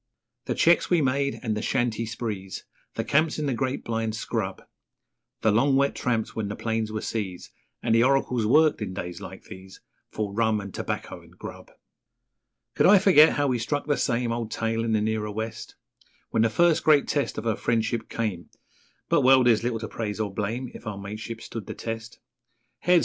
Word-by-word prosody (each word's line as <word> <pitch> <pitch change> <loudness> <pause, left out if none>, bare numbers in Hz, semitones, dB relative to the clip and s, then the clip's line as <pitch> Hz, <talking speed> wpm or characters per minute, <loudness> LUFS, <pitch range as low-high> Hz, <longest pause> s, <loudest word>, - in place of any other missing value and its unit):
The - - -2
cheques 170 +1 +4
we 175 - +4
made 140 0 0
and 110 -3 -1
the 105 - -2
shanty 115 -2 0
sprees, 105 -4 -5 0.3
The - - -1
camps 155 +2 +2
in 155 - -2
the 135 - 0
great 130 +2 -2
blind 115 -1 -2
scrub, 110 -4 -3 0.8
The 110 - +3
long 135 +6 +3
wet 140 +1 +3
tramps 115 -3 -1
when 110 -2 -2
the 105 - -4
plains 110 -1 -2
were 110 0 -3
seas, 95 -5 -4 0.3
And 115 - +2
the 115 - +5
oracles 125 -4 +2
worked 155 +2 +4
in 95 -3 -4
days 90 -2 -6
like - - -9
these 95 0 -12 0.3
For 105 -2 -3
rum 110 0 +2
and 100 -1 -8
tobacco - - -4
and - - -20
grub. - - -9 1.0
Could - - +4
I 205 +2 +8
forget 180 -5 +6
how 145 - +1
we 125 -3 +1
struck 145 +6 -2
'the 145 - +1
same 120 -1 0
Old 115 -1 -3
tale' 115 0 -1
in 115 -1 0
the 110 - +2
nearer 110 0 -1
West, 110 +2 -5 0.6
When 115 - +2
the 115 - +4
first 170 +7 +3
great 150 -3 +5
test 145 -2 -1
of - - -4
our 110 -2 +1
friendship 115 0 -1
came 105 -7 -3 0.6
But - - +3
well, 130 0 +6
there's 120 -3 +4
little 120 -1 0
to 110 0 -5
praise 105 -2 -4
or 105 -3 -2
blame 115 +6 -3
If - - -11
our 105 -2 -4
mateship 110 +3 -7
stood 110 -4 -7
the - - -6
test. 115 0 -6 0.6
'Heads!' 180 0 +4
115 Hz, 200 wpm, -26 LUFS, 110-130 Hz, 1.0 s, I